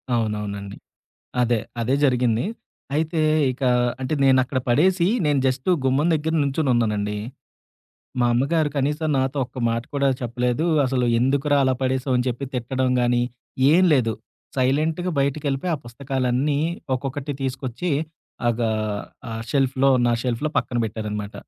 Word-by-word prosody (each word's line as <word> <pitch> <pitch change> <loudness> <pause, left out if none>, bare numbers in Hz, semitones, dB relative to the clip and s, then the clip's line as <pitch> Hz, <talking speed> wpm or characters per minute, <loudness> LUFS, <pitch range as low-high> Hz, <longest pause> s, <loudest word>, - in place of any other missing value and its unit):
అవునవునండి. 105 -3 -3 0.7
అదే. 120 -1 +2 0.2
అదే 125 +4 +1
జరిగింది. 125 -1 +2 0.5
అయితే 160 +1 0 0.3
ఇక 130 +2 -12 0.4
అంటే 130 +4 -1
నేనక్కడ 130 0 +3
పడేసి, 170 +7 +3 0.2
నేను 145 -1 +2
జస్ట్ 130 +6 -1 0.2
గుమ్మం 135 +5 +2
దగ్గర 160 +1 -1
నుంచున్నానండి. 120 -8 0 1.0
మా 120 - +4
అమ్మగారు 145 +5 +1
కనీసం 150 +3 0
నాతో 135 +2 0
ఒక్క 130 +1 -11
మాట 115 0 -1
కూడా 140 -1 +2
చెప్పలేదు. 125 +4 -1 0.2
అసలు 125 -1 0
ఎందుకురా, 140 +3 +2
అలా 130 0 +2
పడేసావు 130 0 0
అని 125 - -1
చెప్పి 125 +3 -3
తిట్టడం 130 +1 -1
గానీ, 120 0 +2 0.5
ఏం 180 +3 +5
లేదు. 115 -5 +2 0.4
సైలెంట్‌గా 155 +7 +1
బయటికెళ్ళిపోయి, 140 +3 -1
ఆ - - -12
పుస్తకాలన్నీ 130 +2 -1 0.4
ఒక్కొక్కటి 140 +2 -4
తీసుకొచ్చి, 130 +5 -3 0.6
ఆగా 115 -1 0 0.6
ఆహ్, 115 0 -4
షెల్ఫ్‌లో 135 -1 +2 0.2
నా 120 - +3
షెల్ఫ్‌లో 125 +5 -1
పక్కన 120 - -3
పెట్టారన్నమాట. 105 -1 -4
130 Hz, 125 wpm, -23 LUFS, 120-145 Hz, 1.0 s, ఏం